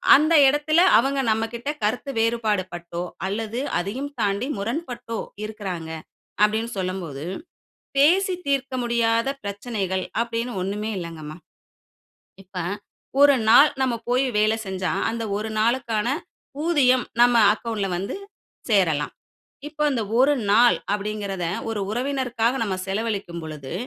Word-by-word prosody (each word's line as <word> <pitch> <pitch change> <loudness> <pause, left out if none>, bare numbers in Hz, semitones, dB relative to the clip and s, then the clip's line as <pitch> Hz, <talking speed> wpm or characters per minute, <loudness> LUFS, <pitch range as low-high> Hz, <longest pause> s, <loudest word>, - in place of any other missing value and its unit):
அந்த 310 +4 +3
இடத்தில 295 +3 +2 0.2
அவங்க 270 +4 +1
நம்மகிட்ட 225 +4 -2
கருத்து 245 +6 -1
வேறுபாடு 225 -3 +1
பட்டோ, 170 0 -6 0.3
அல்லது 220 +4 -3 0.2
அதையும் 245 +11 -4
தாண்டி 205 +4 0
முரண்பட்டோ, 240 +1 -4 0.3
இருக்கறாங்க 195 -6 -5 0.5
அப்படின்னு 220 +2 +2
சொல்லும்போது, 180 -7 -4 0.8
பேசி 365 +7 +4
தீர்க்க 275 -1 0
முடியாத 230 -1 +1 0.2
பிரச்சனைகள், 200 -2 -3 0.2
அப்படின்னு 235 +1 -3
ஒண்ணுமே 210 +3 -3
இல்லங்கம்மா. 160 -3 -7 1.1
இப்ப 185 0 -12 0.6
1 285 -1 +7
நாள் 285 +6 +8
நம்ம 255 -3 +1
போய் 255 +2 +3
வேலை 215 +1 +3
செஞ்சா, 190 -1 -2 0.2
அந்த 230 0 -3
1 215 +1 -4
நாளுக்கான 230 -1 +1 0.6
ஊதியம் 255 -7 +3 0.2
நம்ம 240 0 +6 0.2
அக்கவுண்ட்ல 215 -3 -3
வந்து 195 +3 -4 0.5
சேரலாம். 175 -9 +2 0.6
இப்ப 300 0 -4
அந்த 250 -5 0 0.2
ஒரு 270 +3 +5 0.2
நாள் 235 +4 +6 0.2
அப்படிங்ககிறதை 200 -3 -3 0.2
ஒரு 225 -2 -2
உறவினருக்காக 250 -1 0
நாம 195 -4 -1
செலவழிக்கும் 200 -4 -3
பொழுது, 150 -4 -7
225 Hz, 115 wpm, -23 LUFS, 195-250 Hz, 1.1 s, நாள்